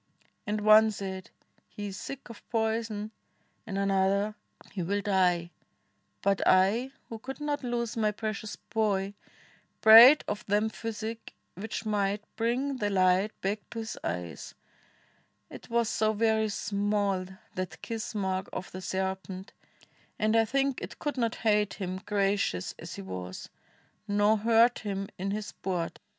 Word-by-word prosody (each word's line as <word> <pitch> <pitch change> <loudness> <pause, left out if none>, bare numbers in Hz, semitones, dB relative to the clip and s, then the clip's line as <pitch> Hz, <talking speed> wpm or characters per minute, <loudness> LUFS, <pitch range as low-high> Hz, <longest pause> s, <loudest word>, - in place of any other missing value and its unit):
And 210 0 -1
one 215 +1 +7
said, 190 -3 -5 0.4
'He 205 -1 -6
is 195 - -7
sick 275 +5 -7
Of 225 - -13
poison'; 220 -2 -1 0.6
and 195 -3 -3
another, 195 +1 +2 0.4
'He 190 - -4
will 200 +4 0
die.' 180 -4 +2 0.7
But 200 -1 +2
I, 200 +8 +4 0.2
who 225 - -7
could 265 +5 -7
not 295 -1 -2
lose 240 -2 -2
my 215 -2 +2
precious 215 0 -4
boy, 200 -3 -1 0.7
Prayed 235 +7 +10
of 210 - -3
them 210 +2 +2
physic, 225 0 -6 0.2
which 220 +4 -5
might 205 -1 0
bring 250 +5 0
the 205 -4 0
light 185 +1 +2
Back 200 +2 -1
to - - -8
his 225 +1 -4
eyes; 85 -1 -5 1.0
it - - -11
was 235 -1 +2
so 215 0 +1
very 220 0 +2
small 200 -2 0 0.3
That 185 0 -5
kiss 230 0 -4
mark 190 -2 -1
of 185 - -6
the 185 - -7
serpent, 190 0 -4 0.6
and 215 +1 +2
I 225 0 +5
think 275 +3 0
It 215 +6 -7
could 295 -2 -3
not 230 -2 0
hate 210 -1 +3
him, 185 -1 -4
gracious 200 - 0
as - - -7
he - - -7
was, 95 -1 -7 0.6
Nor 205 +1 +3
hurt 230 +2 +4
him 195 -1 -4
in 195 +2 -2
his 210 +1 -2
sport. 180 -5 -4
210 Hz, 145 wpm, -29 LUFS, 195-225 Hz, 1.0 s, Prayed